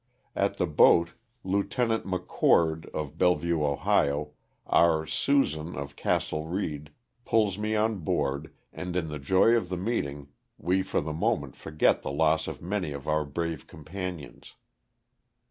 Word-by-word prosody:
At 100 0 0
the - - +1
boat 85 +1 +5 0.3
Lieut. 100 +1 -1
Mc 115 -7 0
Oord, 80 -1 +3
of 75 +1 -6
Bellevue, 85 -2 +2
0, 75 0 +1 0.3
our 80 -2 +3
''Susan" 80 - 0
of 70 +1 -6
Castle 75 +1 -1
Reed 75 -5 -3 0.2
— - - -54
pulls 105 -5 +1
me 110 +1 -1
on 110 -1 +1
board, 70 -2 -1 0.2
and 90 -1 -5
in 85 -3 -1
the 75 -1 -5
joy 95 +10 +4
of 110 -7 -1
the 90 - -2
meeting 75 -9 -3 0.3
we 95 +2 +1
for - - -1
the 75 +1 -4
moment 80 - -1
forget 75 -1 +1
the - - -4
loss 80 +2 +2
of - - -7
many 90 -4 -2
of 70 +1 -8
our 75 0 +2
brave 80 +1 -4
companions. 85 -1 -8
85 Hz, 150 wpm, -28 LUFS, 75-95 Hz, 0.3 s, boat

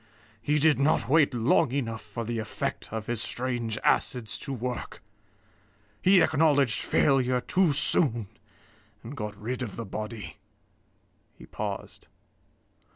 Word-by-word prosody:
He 150 +6 +1
did 150 -3 +4
not 140 -3 +2
wait 150 +2 +4
long 125 +3 +2
enough 115 -5 -3
for 110 +2 -6
the 115 0 -3
effect 110 0 -4
of 110 -1 -4
his 120 -1 -1
strange 120 -1 -2
acids 120 -4 +1
to 140 - -5
work. 125 -1 -5 1.0
He 185 -1 +6
acknowledged 145 -6 +3
failure 130 -3 +2
too 180 +6 +2
soon, 135 -5 +2 0.8
and 125 +6 -8
got 105 -4 -6
rid 120 +4 -4
of 115 -6 -5
the 115 - -5
body." 110 +1 -6 1.0
He - - -13
paused. - - -6
125 Hz, 130 wpm, -27 LUFS, 110-140 Hz, 1.0 s, He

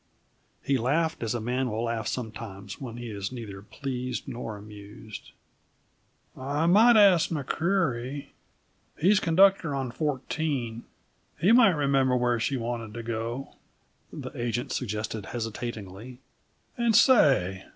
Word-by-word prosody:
He 135 -1 +1
laughed, 155 +7 0
as 115 0 -1
a - - -1
man 125 +3 -1
will 110 +1 -2
laugh 115 -2 -2
sometimes 110 -4 -6
when 120 -3 -6
he 120 -2 -6
is 100 0 -4
neither 110 -6 -7
pleased 125 +3 -5
nor 115 -3 -5
amused. 105 +1 -11 1.1
"I 145 +4 -1
might 220 +7 +6
ask 195 -6 +6
McCreery 145 -4 -1 0.7
he's 190 +6 +4
conductor 175 -3 +4
on 135 -3 -3
Fourteen. 135 -4 -2 0.5
He 190 - +4
might 230 -7 +6
remember 135 -3 +2
where 120 -1 +1
she 135 +4 0
wanted 115 -2 -4
to 115 - -5
go," 115 +3 -4 0.6
the - - -7
agent 120 0 -3
suggested 110 -3 -3
hesitatingly. 115 -1 -6 0.6
"And 235 -2 +3
say! 135 - +4
125 Hz, 125 wpm, -27 LUFS, 110-145 Hz, 1.1 s, might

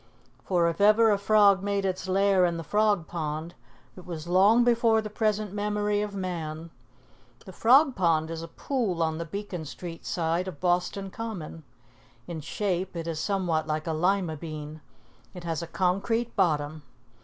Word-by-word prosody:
For 175 -3 +2
if 170 +4 -2
ever 215 +2 +6
a 205 - +3
frog 200 -2 +5
made 200 0 -1
its 190 0 -2
lair 195 0 +3
in 170 -1 +1
the 165 - -5
Frog 210 0 +1
Pond, 160 0 -4 0.4
it 185 - -11
was 165 -3 -7
long 200 +7 +5
before 235 -2 +3
the 215 -1 -5
present 215 -2 -1
memory 210 0 0
of 210 -1 -4
man. 165 -4 -5 0.7
The 190 - -10
Frog 265 - +5
Pond 165 -3 +1
is 165 -1 -5
a 165 - -6
pool 190 -3 -2
on 160 0 -1
the 170 - -3
Beacon 185 -1 -5
Street 165 +2 -8
side 170 +2 -1
of 165 -6 -7
Boston 180 +2 0
Common. 190 -9 -6 0.6
In 160 +1 -6
shape 185 +2 -2
it 165 -1 -4
is 160 -2 -3
somewhat 170 -3 0
like 155 0 -2
a 160 - -1
lima 175 0 0
bean. 155 -1 -7 0.5
It 180 - -8
has 165 -1 -2
a 170 - -6
concrete 200 +7 0
bottom. 155 -5 0
180 Hz, 170 wpm, -27 LUFS, 165-205 Hz, 0.7 s, ever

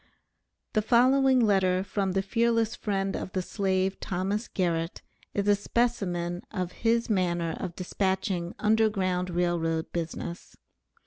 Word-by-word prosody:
The 215 - +3
following 260 +3 +4
letter 190 -4 +3
from 195 -1 -1
the 195 0 +1
fearless 230 +2 +1
friend 195 -2 -1
of 185 - -5
the 185 - -1
slave, 190 -1 0
Thomas 195 +4 -2
Garrett, 170 -2 -1 0.3
is 200 0 0
a 205 - +6
specimen 195 -6 -1
of 185 -4 -3
his 230 +2 +1
manner 175 -5 0
of 175 - -5
dispatching 190 -1 -1
Underground 200 -4 +1
Rail 175 0 +1
Road 165 0 -2
business. 170 +1 -5
190 Hz, 130 wpm, -28 LUFS, 175-215 Hz, 0.3 s, a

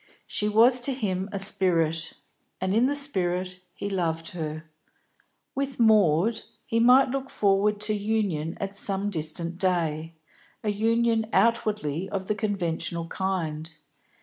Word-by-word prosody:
She 210 - -1
was 240 +4 +5
to 270 +2 0
him 195 -6 -2
a 200 - -3
spirit, 170 -5 +2 0.5
and 185 +1 -1
in 235 +4 +3
the 285 - -1
spirit 185 -9 -2
he 200 - -6
loved 165 -4 -2
her. 155 -2 -5 0.9
With 275 -2 -3
Maud 215 -2 +3 0.2
he 230 - 0
might 250 +2 +5
look 270 0 -3
forward 205 +1 +1
to 210 0 +1
union 200 -7 -1
at 195 0 -4
some 200 0 +1
distant 170 +1 -2
day, 165 -3 -1 0.5
a 215 - -1
union 225 +1 +1
outwardly 210 -8 0
of 190 -1 -3
the 210 - 0
conventional 170 -5 -2
kind. 165 -5 -3
195 Hz, 135 wpm, -26 LUFS, 170-220 Hz, 0.9 s, was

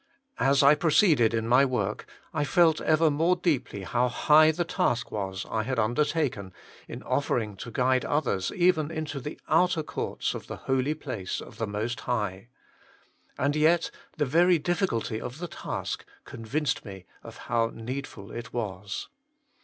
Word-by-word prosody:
As 140 +1 +4
I 140 +2 +8
proceeded 150 - +4
in 115 -1 -1
my 125 +3 +5
work, 110 -6 -1 0.3
I 150 -3 0
felt 165 +1 +3
ever 155 0 +3
more 165 +5 +2
deeply 140 - -1
how 120 +7 +1
high 155 +5 +5
the 170 +2 0
task 120 -7 0
was 95 -1 -4
I 110 - -1
had 130 +4 -3
undertaken 120 - 0 0.3
in - - -8
offering 115 -7 -1
to 120 - -7
guide 130 +2 +1
others 125 -11 0
even 175 -4 +3
into 155 -3 -4
the 150 +4 -7
outer 165 0 +3
courts - - -3
of - - -7
the - - -5
Holy 135 +3 +1
Place 125 -11 -5
of - - -11
the 115 - -1
Most 110 +4 -3
High. 105 -3 -3 0.9
And 140 +2 +1
yet 160 +3 +3 0.3
the 150 - +1
very 170 +6 +4
difficulty 155 - -1
of 125 +3 -6
the 175 +2 -5
task - - -5 0.2
convinced 135 +7 -2
me 95 -4 -10 0.2
of - - -11
how 115 -1 +1
needful 115 -4 -7
it 115 -1 -7
was. 100 -3 -4
130 Hz, 160 wpm, -27 LUFS, 110-155 Hz, 0.9 s, I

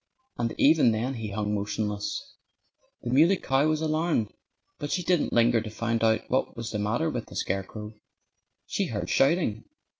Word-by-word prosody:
And 115 -1 -1
even 145 -6 +5
then 120 +5 -1
he 110 -4 -5
hung 105 +1 -2
motionless. 105 0 -3 0.7
The 120 - -3
Muley 165 +9 +5
Cow 135 0 +1
was 155 0 +1
alarmed. 155 -7 0 0.5
But 145 - -4
she 180 - 0
didn't 175 -2 +1
linger 120 -1 +4
to 110 - -6
find 115 +1 -1
out 110 0 +2
what 130 -1 -1
was 115 -1 -4
the 105 - -2
matter 115 +10 0
with 120 -5 -4
the - - -12
scarecrow. 105 +3 -3 0.7
She - - -1
heard - - -3
shouting. 135 - +2
115 Hz, 170 wpm, -27 LUFS, 110-150 Hz, 0.7 s, even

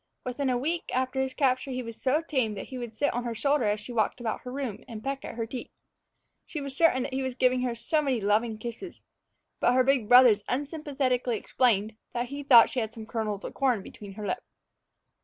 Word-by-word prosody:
Within 260 +2 -1
a 250 - +2
week 325 +7 -1
after 260 +1 0
his 265 0 -2
capture 260 -2 +1
he 255 -1 -3
was 230 -1 -9
so 290 +5 +2
tame 255 -9 0
that 195 - -7
he 260 -2 -6
would 235 -2 -7
sit 285 +5 +1
on 245 - -2
her 235 -1 -3
shoulder 280 +2 +1
as 210 0 +1
she 225 +4 -8
walked 220 +1 0
about 230 -2 -3
her 250 - -7
room 255 -6 -4
and 220 -3 -8
peck 275 0 -3
at - - -7
her 230 -1 -2
teeth. 245 +2 -7 0.8
She 310 - -5
was 275 -2 -6
certain 280 -5 +4
that 260 - -5
he 265 - -1
was 260 -1 -3
giving 255 0 +2
her 245 -2 -1
so 235 +7 +1
many 270 -5 0
loving 215 +2 +1
kisses; 235 - -8 0.6
but 245 - +3
her 255 0 +4
big 255 -5 +2
brothers 245 -4 +7
unsympathetically 270 -4 -1
explained 220 -4 +1 0.2
that 240 0 -2
he 285 +1 -5
thought 250 -5 +7
she 255 - -1
had 220 -2 -3
some 220 -1 -8
kernels 215 -3 -3
of - - -6
corn 250 -7 +1
between 200 0 -10
her 210 +1 -7
lips. 185 - -3
250 Hz, 230 wpm, -28 LUFS, 225-270 Hz, 0.8 s, brothers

